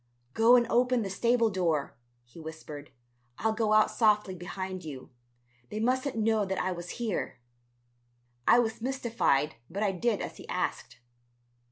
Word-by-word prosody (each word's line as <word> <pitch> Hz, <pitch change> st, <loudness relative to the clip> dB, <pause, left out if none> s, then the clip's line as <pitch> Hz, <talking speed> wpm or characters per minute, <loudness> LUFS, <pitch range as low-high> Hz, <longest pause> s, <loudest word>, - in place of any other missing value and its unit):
"Go 230 Hz, +2 st, +6 dB
and 240 Hz, -1 st, +4 dB
open 245 Hz, 0 st, +2 dB
the 195 Hz, -, -4 dB
stable 235 Hz, +2 st, +2 dB
door," 165 Hz, -7 st, 0 dB, 0.3 s
he 120 Hz, +7 st, -15 dB
whispered, 155 Hz, -2 st, -9 dB, 0.5 s
"I'll 220 Hz, 0 st, +1 dB
go 220 Hz, -1 st, 0 dB
out 215 Hz, 0 st, +5 dB
softly 210 Hz, -4 st, +2 dB
behind 185 Hz, +1 st, -6 dB
you. 140 Hz, -5 st, -8 dB, 0.6 s
They 215 Hz, -, -4 dB
mustn't 255 Hz, +2 st, 0 dB
know 220 Hz, -1 st, +2 dB
that 190 Hz, -1 st, -2 dB
I 185 Hz, -, 0 dB
was 175 Hz, -1 st, -6 dB
here." 230 Hz, -5 st, -2 dB, 1.1 s
I -, -, +7 dB
was 225 Hz, -2 st, 0 dB
mystified 230 Hz, -, 0 dB
but 200 Hz, +5 st, -2 dB
I 200 Hz, -, +2 dB
did 205 Hz, +3 st, 0 dB
as -, -, -6 dB
he -, -, -12 dB
asked. -, -, -3 dB
210 Hz, 155 wpm, -29 LUFS, 180-235 Hz, 1.1 s, I